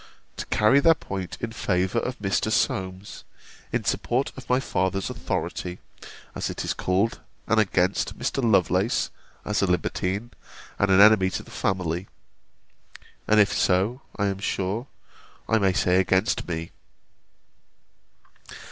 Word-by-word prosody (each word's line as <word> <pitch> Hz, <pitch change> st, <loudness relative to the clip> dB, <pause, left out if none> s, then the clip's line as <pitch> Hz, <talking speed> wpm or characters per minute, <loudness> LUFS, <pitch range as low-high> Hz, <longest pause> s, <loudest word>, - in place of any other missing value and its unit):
] -, -, -39 dB
to -, -, -6 dB
carry 120 Hz, +6 st, +4 dB
their 165 Hz, +3 st, +5 dB
point 95 Hz, -, -6 dB
in 120 Hz, -, -3 dB
favour 95 Hz, -4 st, 0 dB
of 125 Hz, 0 st, -4 dB
Mr. 100 Hz, +1 st, 0 dB
Solmes, 95 Hz, -1 st, -2 dB, 0.5 s
in -, -, -1 dB
support 130 Hz, +3 st, 0 dB
of 130 Hz, -, -11 dB
my 125 Hz, +1 st, +3 dB
father's 95 Hz, -6 st, -1 dB
authority, 90 Hz, 0 st, -4 dB, 0.6 s
as -, -, -3 dB
it -, -, -4 dB
is -, -, 0 dB
called, 95 Hz, +5 st, 0 dB, 0.3 s
and 110 Hz, -1 st, +2 dB
against 95 Hz, -2 st, +1 dB
Mr. 130 Hz, +2 st, -2 dB
Lovelace, 95 Hz, 0 st, +2 dB, 0.3 s
as 105 Hz, 0 st, 0 dB
a 100 Hz, -, +2 dB
libertine, 95 Hz, +4 st, -1 dB, 0.5 s
and 100 Hz, -, +2 dB
an 95 Hz, 0 st, +5 dB
enemy 105 Hz, -2 st, +7 dB
to -, -, -4 dB
the -, -, -16 dB
family: 90 Hz, -1 st, -2 dB, 1.2 s
and 110 Hz, 0 st, +4 dB
if 105 Hz, -, +4 dB
so, 100 Hz, +8 st, +1 dB, 0.2 s
I 100 Hz, -, +1 dB
am 100 Hz, -1 st, -1 dB
sure, 100 Hz, +5 st, -2 dB, 0.6 s
I 110 Hz, -, +3 dB
may 95 Hz, -2 st, +3 dB
say 90 Hz, 0 st, +3 dB
against 95 Hz, +3 st, +1 dB
me. 85 Hz, -1 st, -4 dB
100 Hz, 140 wpm, -25 LUFS, 95-110 Hz, 1.2 s, enemy